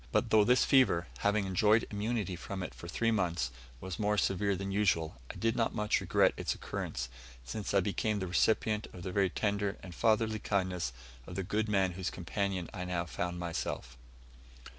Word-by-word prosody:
But -, -, +1 dB
though 110 Hz, -1 st, +7 dB
this 125 Hz, +4 st, +4 dB
fever, 115 Hz, -11 st, +4 dB
having 105 Hz, 0 st, +2 dB
enjoyed 105 Hz, +4 st, +3 dB
immunity 105 Hz, -2 st, -1 dB
from 95 Hz, +2 st, -5 dB
it -, -, -6 dB
for 85 Hz, -, -10 dB
three 115 Hz, +7 st, +1 dB
months, 85 Hz, -, 0 dB, 0.3 s
was 95 Hz, 0 st, -6 dB
more 105 Hz, 0 st, +1 dB
severe 100 Hz, 0 st, +2 dB
than 95 Hz, +1 st, -4 dB
usual, 85 Hz, -9 st, +1 dB
I -, -, -7 dB
did 115 Hz, +1 st, 0 dB
not 115 Hz, -, 0 dB
much 105 Hz, -1 st, +1 dB
regret -, -, +3 dB
its -, -, -1 dB
occurrence, 60 Hz, -, -4 dB, 0.4 s
since 105 Hz, -, -4 dB
I 100 Hz, -, +4 dB
became 105 Hz, +2 st, 0 dB
the 95 Hz, -, -2 dB
recipient 105 Hz, +4 st, +2 dB
of 90 Hz, -, -9 dB
the 95 Hz, -, -3 dB
very 95 Hz, 0 st, +2 dB
tender 100 Hz, +1 st, -1 dB
and 90 Hz, -2 st, -8 dB
fatherly 110 Hz, +1 st, +2 dB
kindness 90 Hz, -9 st, -1 dB, 0.4 s
of 90 Hz, -, -7 dB
the 95 Hz, -, -1 dB
good 105 Hz, +3 st, -1 dB
man 95 Hz, -3 st, +2 dB
whose 90 Hz, +1 st, -3 dB
companion 95 Hz, 0 st, -2 dB
I 90 Hz, -, -4 dB
now 90 Hz, -1 st, -1 dB
found 90 Hz, +1 st, -3 dB
myself. 85 Hz, -7 st, -4 dB
100 Hz, 185 wpm, -32 LUFS, 90-105 Hz, 0.4 s, though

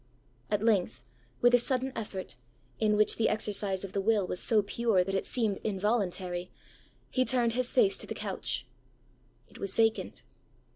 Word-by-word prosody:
At 210 Hz, 0 st, 0 dB
length, 185 Hz, -, +1 dB, 0.4 s
with 245 Hz, 0 st, +5 dB
a 245 Hz, -, +7 dB
sudden 260 Hz, +1 st, 0 dB
effort, 195 Hz, -, -5 dB, 0.4 s
in 210 Hz, -1 st, +2 dB
which 215 Hz, -, +3 dB
the 225 Hz, -, +2 dB
exercise 205 Hz, -3 st, +1 dB
of 195 Hz, -, -7 dB
the 200 Hz, -, 0 dB
will 210 Hz, -1 st, +2 dB
was 180 Hz, -, -3 dB
so 215 Hz, -3 st, +2 dB
pure, 205 Hz, -2 st, +1 dB
that 195 Hz, +1 st, -4 dB
it 195 Hz, -, -1 dB
seemed 220 Hz, -5 st, 0 dB
involuntary, 190 Hz, -4 st, -1 dB, 0.6 s
he 255 Hz, -, +2 dB
turned 245 Hz, -3 st, +1 dB
his 250 Hz, +1 st, 0 dB
face 410 Hz, -5 st, +3 dB
to -, -, -8 dB
the -, -, -5 dB
couch. -, -, -4 dB, 0.8 s
It -, -, -16 dB
was 195 Hz, -1 st, -3 dB
vacant. 225 Hz, 0 st, 0 dB
215 Hz, 165 wpm, -30 LUFS, 195-235 Hz, 0.8 s, a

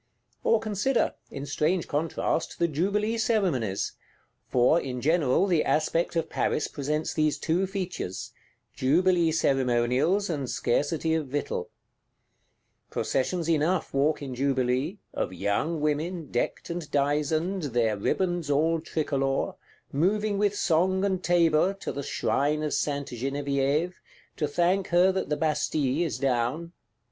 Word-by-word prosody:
Or 230 Hz, -, +4 dB
consider, 220 Hz, +4 st, 0 dB, 0.2 s
in 140 Hz, -, -6 dB
strange 155 Hz, +5 st, 0 dB
contrast, 160 Hz, +2 st, -1 dB
the 170 Hz, -, +2 dB
jubilee 205 Hz, +8 st, 0 dB
Ceremonies; 175 Hz, -, 0 dB, 0.6 s
for, 125 Hz, +7 st, +4 dB
in 125 Hz, -4 st, -4 dB
general, 155 Hz, +3 st, +2 dB
the 175 Hz, -5 st, +2 dB
aspect 165 Hz, +3 st, +1 dB
of 165 Hz, -, 0 dB
Paris 150 Hz, -, 0 dB
presents 150 Hz, +2 st, -2 dB
these 155 Hz, -2 st, +1 dB
two 175 Hz, +4 st, 0 dB
features: 185 Hz, -, -4 dB, 0.4 s
jubilee 170 Hz, +4 st, +3 dB
ceremonials 135 Hz, +6 st, +2 dB
and 140 Hz, -7 st, -3 dB
scarcity 160 Hz, +5 st, 0 dB
of 160 Hz, -3 st, -1 dB
victual. 145 Hz, +2 st, -3 dB, 1.2 s
Processions 165 Hz, +5 st, -1 dB
enough 165 Hz, +2 st, +1 dB
walk 145 Hz, +2 st, +1 dB
in 135 Hz, -2 st, -5 dB
jubilee; 130 Hz, +5 st, 0 dB, 0.2 s
of 95 Hz, -, -2 dB
Young 100 Hz, -, -1 dB
Women, 155 Hz, +2 st, -2 dB
decked 120 Hz, -, -2 dB
and 170 Hz, -3 st, -5 dB
dizened, 150 Hz, +5 st, 0 dB
their 115 Hz, -5 st, +1 dB
ribands 175 Hz, -, -1 dB
all 160 Hz, +3 st, +2 dB
tricolor; 140 Hz, -4 st, -1 dB, 0.4 s
moving 200 Hz, +7 st, +1 dB
with 205 Hz, -1 st, +2 dB
song 190 Hz, +1 st, +2 dB
and 190 Hz, -2 st, -1 dB
tabor, 175 Hz, +1 st, +3 dB
to 195 Hz, -, -5 dB
the 140 Hz, -, -4 dB
Shrine 150 Hz, +2 st, 0 dB
of 150 Hz, -, -1 dB
Sainte 140 Hz, -1 st, -1 dB
Genevieve, 140 Hz, +6 st, -1 dB, 0.4 s
to 150 Hz, -, 0 dB
thank 175 Hz, +6 st, +1 dB
her 180 Hz, +2 st, +4 dB
that 190 Hz, -4 st, -2 dB
the 150 Hz, -, 0 dB
Bastille 150 Hz, -1 st, 0 dB
is 140 Hz, -9 st, -2 dB
down. 130 Hz, +5 st, -1 dB
155 Hz, 130 wpm, -27 LUFS, 140-175 Hz, 1.2 s, Or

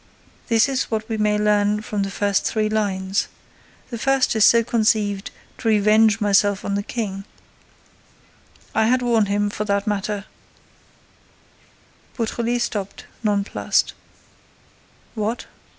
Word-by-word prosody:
This 225 Hz, 0 st, +3 dB
is 270 Hz, -1 st, -2 dB
what 220 Hz, -1 st, -2 dB
we 225 Hz, -, -2 dB
may 210 Hz, 0 st, +1 dB
learn 210 Hz, 0 st, +1 dB
from 210 Hz, -2 st, -3 dB
the 195 Hz, -, -1 dB
first 200 Hz, 0 st, 0 dB
three 215 Hz, -1 st, 0 dB
lines. 195 Hz, -2 st, -1 dB, 0.6 s
The 235 Hz, -, -5 dB
first 270 Hz, -1 st, +2 dB
is 220 Hz, -, +3 dB
so 230 Hz, +1 st, +6 dB
conceived 215 Hz, -3 st, 0 dB, 0.3 s
to 230 Hz, -, -4 dB
revenge 215 Hz, 0 st, +4 dB
myself 205 Hz, -1 st, +2 dB
on 200 Hz, -, -2 dB
the 200 Hz, -, 0 dB
King; 200 Hz, -3 st, -4 dB, 1.5 s
I 220 Hz, -, +2 dB
had 250 Hz, +1 st, +2 dB
warned 230 Hz, -4 st, +2 dB
him, 205 Hz, +1 st, 0 dB
for 210 Hz, -, -3 dB
that 200 Hz, -1 st, 0 dB
matter— 205 Hz, -1 st, -2 dB, 1.9 s
Beautrelet 235 Hz, +1 st, -1 dB
stopped, 200 Hz, -4 st, -5 dB, 0.2 s
nonplussed. 205 Hz, -2 st, 0 dB, 1.2 s
"What? 220 Hz, +1 st, -3 dB
210 Hz, 125 wpm, -21 LUFS, 200-225 Hz, 1.9 s, so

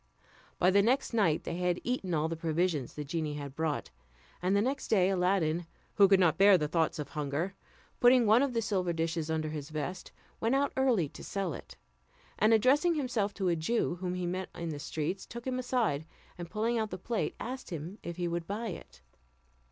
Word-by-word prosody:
By 180 Hz, -, +4 dB
the 200 Hz, +1 st, +5 dB
next 250 Hz, +5 st, +1 dB
night 195 Hz, -9 st, +2 dB
they 170 Hz, -, -4 dB
had 180 Hz, 0 st, 0 dB
eaten 200 Hz, -9 st, -1 dB
all 155 Hz, +1 st, +1 dB
the 165 Hz, -, -3 dB
provisions 160 Hz, -3 st, -1 dB
the 150 Hz, -, -4 dB
genie 150 Hz, 0 st, -3 dB
had 140 Hz, -2 st, -6 dB
brought; 155 Hz, -, -2 dB, 0.5 s
and 185 Hz, +2 st, +2 dB
the 200 Hz, -, +4 dB
next 270 Hz, +3 st, -2 dB
day 190 Hz, -3 st, +3 dB
Aladdin, 180 Hz, -3 st, +1 dB, 0.3 s
who 200 Hz, -2 st, +6 dB
could 195 Hz, -1 st, +5 dB
not 165 Hz, -3 st, +3 dB
bear 200 Hz, -1 st, +8 dB
the 150 Hz, -3 st, -1 dB
thoughts 160 Hz, +1 st, 0 dB
of 150 Hz, -2 st, -5 dB
hunger, 150 Hz, +6 st, -2 dB, 0.5 s
putting 245 Hz, 0 st, +6 dB
one 220 Hz, +3 st, +6 dB
of 280 Hz, -3 st, +1 dB
the 230 Hz, -1 st, 0 dB
silver 185 Hz, -5 st, 0 dB
dishes 165 Hz, -1 st, -1 dB
tinder 160 Hz, -1 st, -1 dB
his 150 Hz, -1 st, -6 dB
vest, 155 Hz, +4 st, -5 dB, 0.3 s
went 230 Hz, +4 st, +1 dB
out 280 Hz, 0 st, +1 dB
early 250 Hz, -, +2 dB
to -, -, -11 dB
sell 195 Hz, -5 st, -2 dB
it, -, -, -10 dB, 0.6 s
and 215 Hz, +2 st, +4 dB
addressing 275 Hz, +10 st, +4 dB
himself 245 Hz, -8 st, 0 dB
to 190 Hz, -3 st, 0 dB
a 170 Hz, -, +2 dB
Jew 175 Hz, +2 st, 0 dB
whom 180 Hz, -1 st, -2 dB
he 180 Hz, -1 st, -2 dB
met 185 Hz, +2 st, -3 dB
in 170 Hz, -1 st, -4 dB
the 150 Hz, -2 st, -4 dB
streets, 160 Hz, +6 st, -3 dB
took 235 Hz, 0 st, -8 dB
him 255 Hz, -1 st, -1 dB
aside, 230 Hz, -, 0 dB, 0.3 s
and 175 Hz, -1 st, -7 dB
pulling 225 Hz, +4 st, 0 dB
out 220 Hz, -1 st, -1 dB
the 185 Hz, -, -5 dB
plate, 225 Hz, +5 st, -2 dB
asked 255 Hz, +2 st, -6 dB
him 170 Hz, +4 st, -6 dB
if 170 Hz, 0 st, -6 dB
he 175 Hz, -1 st, -1 dB
would 170 Hz, 0 st, -3 dB
buy 220 Hz, +3 st, -3 dB
it. 180 Hz, -, -10 dB
180 Hz, 210 wpm, -31 LUFS, 160-225 Hz, 0.6 s, bear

